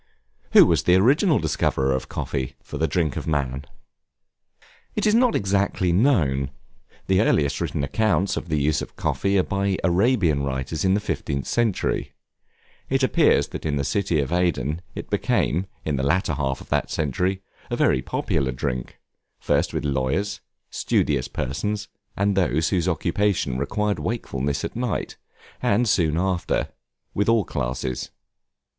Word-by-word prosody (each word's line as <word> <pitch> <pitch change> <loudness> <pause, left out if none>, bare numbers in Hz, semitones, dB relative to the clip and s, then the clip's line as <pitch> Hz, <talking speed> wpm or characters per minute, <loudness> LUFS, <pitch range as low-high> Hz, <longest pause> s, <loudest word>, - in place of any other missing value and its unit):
Who - - +9
was - - +2
the 90 - +5
original 145 - +4
discoverer 70 -4 0
of 65 - -3
Coffee, 65 -2 -3
for - - -7
the 80 - +2
drink 80 -7 0
of - - -5
man? 70 -3 -1 1.3
It 210 - 0
is 210 - +4
not 245 +1 +4
exactly 100 -2 +1
known: 80 - +2 0.6
the 95 +1 +3
earliest 75 -9 +2
written - - -2
accounts 95 +4 +1
of 85 - -5
the 75 -1 +1
use 75 +2 +1
of - - -8
Coffee 100 0 0
are 95 - +4
by 100 0 -1
Arabian 90 - +2
writers 70 +3 -3
in 95 0 +3
the - - +2
15th 70 -9 -3
century; 115 - 0 0.8
it 135 0 +1
appears 130 - +3
that - - -7
in 75 -2 -1
the 70 - 0
city 90 0 0
of 70 +1 -1
Aden 85 -3 0
it - - -7
became, 90 +5 +1 0.2
in 75 -3 0
the - - 0
latter 85 +5 +1
half 70 -2 -2
of - - -13
that - - 0
century, 90 +6 -1 0.3
a - - -1
very 65 - +2
popular 65 +1 -1
drink, 60 0 -4 0.4
first - - +1
with - - -3
lawyers, 70 +9 -1 0.3
studious - - 0
persons, 100 +11 -3 0.3
and 100 0 +1
those 80 -4 +2
whose 90 -3 0
occupation 85 -5 0
required 105 +9 -1
wakefulness 70 - -2
at - - -6
night, 120 -1 -2 0.4
and 115 +4 +2
soon 80 -6 +2
after, 90 -1 0 0.4
with 100 +2 +1
all 115 -4 +3
classes. 65 -1 -3
85 Hz, 155 wpm, -24 LUFS, 70-100 Hz, 1.3 s, Who